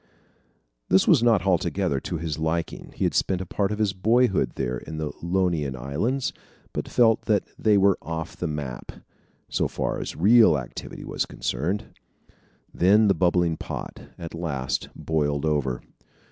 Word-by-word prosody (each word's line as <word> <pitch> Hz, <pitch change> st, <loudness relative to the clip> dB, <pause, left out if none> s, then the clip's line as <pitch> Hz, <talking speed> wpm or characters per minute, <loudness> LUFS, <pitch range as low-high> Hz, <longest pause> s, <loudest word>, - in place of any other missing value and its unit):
This 95 Hz, -, +4 dB
was 150 Hz, -9 st, +6 dB
not 115 Hz, -6 st, +3 dB
altogether 85 Hz, -6 st, +1 dB
to 85 Hz, -, -4 dB
his 80 Hz, -1 st, -4 dB
liking. 80 Hz, +1 st, -2 dB
He -, -, -2 dB
had -, -, +1 dB
spent 95 Hz, -2 st, +1 dB
a 95 Hz, -, -4 dB
part 100 Hz, +3 st, -1 dB
of 105 Hz, -, -2 dB
his 105 Hz, -3 st, +1 dB
boyhood 105 Hz, -, +2 dB
there 65 Hz, -1 st, -2 dB
in 80 Hz, 0 st, -8 dB
the 75 Hz, -1 st, -3 dB
Ionian 85 Hz, -6 st, 0 dB
Islands, 80 Hz, -, -2 dB, 0.4 s
but -, -, -3 dB
felt 115 Hz, -2 st, +3 dB
that 105 Hz, -3 st, +2 dB, 0.2 s
they 105 Hz, -2 st, +4 dB
were 100 Hz, -1 st, +4 dB
"off 80 Hz, -1 st, -5 dB
the 90 Hz, -, -3 dB
map" 75 Hz, -5 st, -5 dB, 0.6 s
so -, -, 0 dB
far -, -, -2 dB
as -, -, -5 dB
real 105 Hz, 0 st, +6 dB
activity 65 Hz, -3 st, -7 dB
was -, -, -2 dB
concerned. 90 Hz, -, -3 dB, 0.8 s
Then 105 Hz, +4 st, +4 dB
the -, -, +5 dB
bubbling 85 Hz, -1 st, +2 dB
pot -, -, -6 dB, 0.2 s
at 85 Hz, -1 st, -7 dB
last 75 Hz, -6 st, -3 dB
boiled 75 Hz, -1 st, -1 dB
over. 70 Hz, -5 st, 0 dB
85 Hz, 160 wpm, -25 LUFS, 75-100 Hz, 0.8 s, was